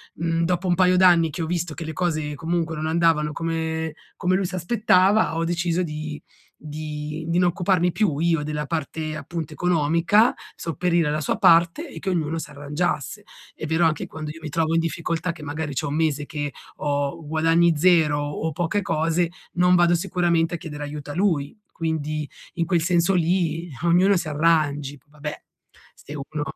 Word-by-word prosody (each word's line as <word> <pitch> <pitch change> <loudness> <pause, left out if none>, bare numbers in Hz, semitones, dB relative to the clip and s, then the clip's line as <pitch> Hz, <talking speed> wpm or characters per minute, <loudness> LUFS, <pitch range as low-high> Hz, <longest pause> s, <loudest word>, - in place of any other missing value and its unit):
mhmm, 165 0 0
dopo 180 +2 0
un 175 - +3
paio 180 0 +4
d'anni 175 -3 +5
che 155 - -5
ho - - -1
visto 170 -1 -2
che 165 +1 -6
le 160 - -5
cose 155 -4 -1
comunque 165 +1 -2
non 155 0 -3
andavano 160 -2 +2
come 160 0 -2 0.2
come 185 0 +1
lui 190 0 0
si 185 - -4
aspettava, 195 0 +3
ho 165 - 0
deciso 175 +1 0
di 155 -2 -5 0.4
di 150 0 -5
non - - +3
occuparmi 180 0 +1
più 195 -10 +1
io 165 -2 +2
della 150 0 -3
parte 155 0 -3
appunto 155 +1 -5
economica, 175 +6 +3 0.2
sopperire 170 +1 0
alla 150 +1 -1
sua 145 - -1
parte 170 - +4
e - - -10
che 195 - -3
ognuno 165 -3 -1
s'arrangiasse. 145 0 -3 0.3
È - - -6
vero 160 +2 +2
anche 160 -2 0
quando, 155 -1 -7
io 160 - -11
mi 155 - -4
trovo 160 +1 0
in - - +4
difficoltà 165 +1 -2
che 165 - -12
magari 150 0 -4
c'ho 145 +2 -2
un 145 - -2
mese 155 -2 0
che 145 -1 -4 0.3
ho 145 +2 -2
guadagni 165 +2 +3
0 160 -3 +4
o 145 +2 -3
poche 175 +6 -1
cose 165 +2 +1 0.2
non 180 +1 +4
vado 175 0 +4
sicuramente 170 -1 +1
a - - -3
chiedere 150 -3 -7
aiuto 145 0 -7
a - - -7
lui. 170 -4 0
Quindi 155 -2 -3 0.3
in 170 - 0
quel 170 -1 +1
senso 175 +1 +2
lì, 170 -1 +1
ehm, 140 -6 -11
ognuno 185 +4 +5
si 170 - -3
arrangi. 145 -2 +1
Vabbè 150 0 -7 0.5
se 150 - -11
uno 150 +1 -4
165 Hz, 180 wpm, -23 LUFS, 150-175 Hz, 0.5 s, d'anni